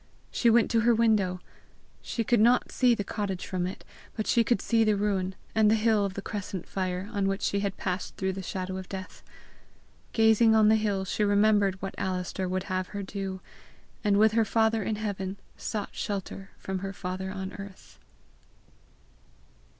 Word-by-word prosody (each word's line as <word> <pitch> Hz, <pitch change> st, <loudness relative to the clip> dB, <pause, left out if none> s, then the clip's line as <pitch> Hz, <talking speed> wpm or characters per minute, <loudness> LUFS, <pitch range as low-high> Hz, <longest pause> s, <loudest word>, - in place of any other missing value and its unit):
She 235 Hz, -, +3 dB
went 230 Hz, 0 st, +4 dB
to 230 Hz, -, +3 dB
her 235 Hz, +1 st, +4 dB
window. 210 Hz, -5 st, +2 dB, 0.6 s
She 230 Hz, -, -2 dB
could 235 Hz, +1 st, +2 dB
not 240 Hz, +3 st, +4 dB
see 245 Hz, -2 st, +4 dB
the 205 Hz, -, -2 dB
cottage 195 Hz, -2 st, -3 dB
from 180 Hz, -1 st, -2 dB
it, 185 Hz, -, -8 dB, 0.3 s
but 215 Hz, -, -2 dB
she 235 Hz, -, +3 dB
could 240 Hz, -, +1 dB
see 230 Hz, -1 st, +2 dB
the 215 Hz, -1 st, +3 dB
ruin, 195 Hz, -2 st, -1 dB, 0.2 s
and 215 Hz, -1 st, +4 dB
the 220 Hz, -, +5 dB
hill 220 Hz, -1 st, +3 dB
of 195 Hz, -1 st, -4 dB
the 200 Hz, -, -5 dB
crescent 195 Hz, -4 st, -5 dB
fire, 185 Hz, 0 st, -3 dB
on 200 Hz, -2 st, +1 dB
which 195 Hz, 0 st, -1 dB
she 200 Hz, -, +1 dB
had 200 Hz, -1 st, -2 dB
passed 185 Hz, 0 st, -3 dB
through 190 Hz, 0 st, -1 dB
the 190 Hz, -, -5 dB
shadow 185 Hz, 0 st, -4 dB
of 190 Hz, -1 st, -8 dB
death. 190 Hz, -1 st, -7 dB, 0.9 s
Gazing 220 Hz, 0 st, +5 dB
on 215 Hz, -1 st, +6 dB
the 220 Hz, -, +6 dB
hill 205 Hz, -3 st, 0 dB
she 210 Hz, -, -1 dB
remembered 205 Hz, -1 st, +3 dB
what 195 Hz, -, -3 dB
Alister 185 Hz, 0 st, -2 dB
would 185 Hz, 0 st, -1 dB
have 185 Hz, -1 st, -2 dB
her 205 Hz, -1 st, -5 dB
do, 190 Hz, -1 st, -5 dB, 0.6 s
and 205 Hz, -2 st, +3 dB
with 215 Hz, +1 st, +5 dB
her 225 Hz, +1 st, +3 dB
Father 220 Hz, +1 st, +2 dB
in 215 Hz, +2 st, -1 dB
heaven 200 Hz, -2 st, -4 dB, 0.2 s
sought 210 Hz, -2 st, -4 dB
shelter 195 Hz, -1 st, -4 dB
from 190 Hz, -1 st, -4 dB
her 195 Hz, +1 st, -5 dB
father 185 Hz, 0 st, -4 dB
on 190 Hz, 0 st, -5 dB
earth. 200 Hz, -1 st, -11 dB
200 Hz, 185 wpm, -28 LUFS, 190-220 Hz, 0.9 s, on